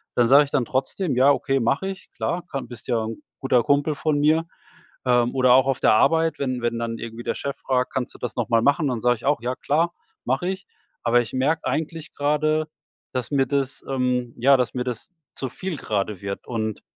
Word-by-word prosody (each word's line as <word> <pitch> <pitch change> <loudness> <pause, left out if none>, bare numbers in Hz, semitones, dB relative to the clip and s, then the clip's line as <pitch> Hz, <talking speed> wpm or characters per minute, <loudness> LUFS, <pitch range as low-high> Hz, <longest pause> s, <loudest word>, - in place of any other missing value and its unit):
dann 120 -1 +4
sage 140 +3 +7
ich 140 - -13
dann 130 -4 +1
trotzdem: 135 +4 -1
„Ja 135 +3 +6
okay, 135 -1 +1
mache 125 +11 0
ich. 195 0 -9
Klar, 175 +1 -2
ka 135 -5 -4
bist 120 -1 -11
ja 115 -3 +1
'n 115 +6 -6 0.2
guter 125 -3 +2
Kumpel 145 +1 +2
von 145 0 0
mir.“ 155 +3 +3 0.6
Ähm, 120 -1 +3
oder 130 -1 +5
auch 130 +1 +5
auf 135 -1 0
der - - +5
Arbeit, 160 +6 +3
wenn 130 -3 -2
wenn 120 -1 -1
dann 115 -1 -3
irgendwie 115 0 -7
der - - -2
Chef 140 -1 -4
fragt: 130 -1 -1
„Kannst 130 -2 -2
du - - -13
das 125 - -4
noch 120 - -1
mal 115 -1 +4
machen?“ 140 +4 +3
Dann 120 -3 -2
sage 120 +1 +3
ich 110 - -16
auch: 140 -5 +2
„Ja 125 +1 -2
klar, 165 +4 0 0.3
mache 135 +8 0
ich.“ 190 +1 -5 0.4
Aber 120 0 +4
ich 115 - -8
merk 150 +5 +1
eigentlich 160 0 -3
gerade, 155 +2 +1 0.5
dass 125 +1 -3
mir 135 -2 +2
das, 135 -1 -1
ähm 125 -2 0
ja, 135 +3 +5
dass 125 -1 -1
mir 125 - -1
das 125 +8 -5 0.2
zu 130 - -3
viel 185 -3 -5
gerade 100 -4 -2
wird 100 0 -5
und 110 -3 -3
130 Hz, 225 wpm, -23 LUFS, 120-145 Hz, 0.6 s, sage